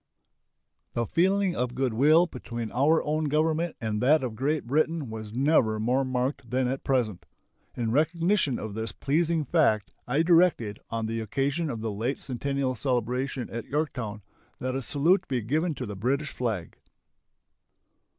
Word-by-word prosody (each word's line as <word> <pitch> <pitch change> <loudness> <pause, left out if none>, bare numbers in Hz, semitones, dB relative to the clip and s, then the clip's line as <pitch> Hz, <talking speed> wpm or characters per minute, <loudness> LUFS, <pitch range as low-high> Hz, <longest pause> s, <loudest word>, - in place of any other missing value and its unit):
The 120 - 0
feeling 190 - +2
of 125 0 -2
good 130 -3 0
will 155 +8 +5
between 120 -7 -6
our 150 +6 +3
own 155 +1 0
Government 155 +3 +1
and 110 -2 -2
that 145 +4 +4
of 125 -3 -2
Great 145 +5 -1
Britain 155 0 0
was 110 -1 -7
never 125 -4 +2
more 125 +5 +1
marked 130 -1 -2
than 130 0 +1
at 135 +2 -3
present. 120 -8 0 0.5
In 115 -2 -1
recognition 165 - +2
of 110 -1 -5
this 110 +1 -4
pleasing 160 +2 0
fact 125 - +2 0.2
I 140 +6 +2
directed, 165 - +3
on 115 -1 -2
the 115 +1 -2
occasion 140 +8 -1
of 115 -4 -4
the 110 -1 -2
late 115 +7 -2
centennial 135 0 -2
celebration 125 +1 -1
at 115 0 -5
Yorktown, 125 -8 -3 0.3
that 130 0 -3
a 135 - -1
salute 160 +9 +2
be 130 -2 0
given 155 +8 0
to 130 - -4
the 105 -2 -6
British 135 +8 -1
flag. 110 -9 -3
130 Hz, 160 wpm, -27 LUFS, 115-155 Hz, 0.5 s, will